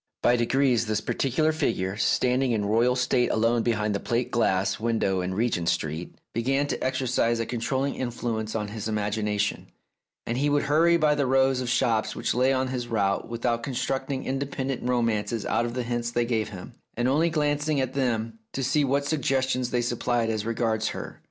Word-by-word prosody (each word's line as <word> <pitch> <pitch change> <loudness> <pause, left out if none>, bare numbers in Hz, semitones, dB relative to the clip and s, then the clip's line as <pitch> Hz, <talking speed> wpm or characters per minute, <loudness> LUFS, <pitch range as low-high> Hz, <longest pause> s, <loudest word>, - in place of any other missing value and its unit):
By 120 - +5
degrees, 120 -1 +2
this 110 -1 0
particular 140 +7 0
figure, 100 -11 -1
standing 125 +3 +2
in 105 -2 0
royal 115 +4 +3
state 125 -1 +2
alone 115 +1 +2
behind 110 -3 0
the 100 - -1
plate 120 +3 -1
glass 95 -5 +1
window 110 -5 0
in 90 +1 -3
Regent 100 -6 0
Street, 80 0 -3 0.2
began 135 +5 +1
to - - -3
exercise 130 -3 +1
a 115 - -1
controlling 130 +4 -1
influ 120 -2 -3
ence 110 0 -5
on 105 -2 -2
his 110 0 -5
imagination, 105 -1 -1 0.6
and 120 +2 -2
he 145 +1 +2
would 145 0 +2
hurry 165 +4 +4
by 155 -2 +3
the 145 -2 0
rows 130 0 +3
of 125 - -3
shops 115 -2 +1
which - - -1
lay 130 +2 +3
on 130 -1 0
his 125 -2 -3
route 100 -2 0
without 115 0 -1
con 130 +1 -5
structing 135 +1 -2
independent 135 -1 -2
romances 115 -3 0
out 120 - +1
of 120 - -6
the 125 - -1
hints 120 0 -2
they 120 0 0
gave 110 -3 -1
him, 95 -3 -9 0.2
and 120 +1 +1
only 155 +6 +3
glancing 150 -1 0
at 130 -1 -1
them 115 -4 -1
to 135 - -2
see 145 +3 +2
what 140 +1 +1
suggestions 130 -4 0
they 120 -1 +1
supplied 120 -1 0
as 110 0 -3
regards 110 -1 0
Her. - - -6
120 Hz, 190 wpm, -26 LUFS, 110-135 Hz, 0.6 s, By